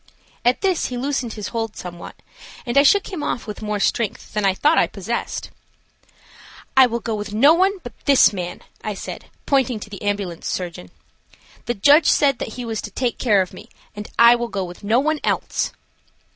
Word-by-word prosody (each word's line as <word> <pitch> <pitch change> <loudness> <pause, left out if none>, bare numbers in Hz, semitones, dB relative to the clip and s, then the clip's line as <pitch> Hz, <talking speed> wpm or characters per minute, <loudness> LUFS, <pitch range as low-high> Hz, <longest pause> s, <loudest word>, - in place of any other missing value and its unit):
At 245 +1 +2
this 380 -3 +1
he 250 - -5
loosened 260 -2 -2
his 210 -2 -5
hold 225 -2 -3
somewhat, 175 -1 -8 0.5
and 240 - -3
I 280 - +8
shook 395 +7 +3
him 340 - -4
off 240 - -3
with 210 0 -7
more 210 -1 -2
strength 215 +1 -1
than 210 -1 -1
I 190 -1 +3
thought 290 - +3
I - - +3
possessed. - - -4 1.2
"I 265 -1 +7
will 235 0 -2
go 225 - -3
with 210 0 -4
no 280 +8 +6
one 380 +4 +2
but 245 - -8
this 275 -6 +6
man," 180 -2 -5 0.2
I 210 -1 -3
said, - - -7 0.2
pointing 260 -5 +1
to 205 - -9
the 200 - -8
ambulance 200 -4 -3
surgeon. 170 - -4 0.8
"The 240 - 0
judge 290 +9 +5
said 275 -3 +3
that 220 - -5
he 250 -1 -6
was 225 -1 -3
to - - -7
take 240 +3 -2
care 205 -6 +3
of 180 - -12
me, - - -12 0.3
and 210 0 -7
I 235 0 +8
will 240 0 -1
go 200 -4 -3
with 175 +1 -9
no 220 +4 +3
one 310 +2 0
else." - - -1
230 Hz, 200 wpm, -21 LUFS, 205-270 Hz, 1.2 s, I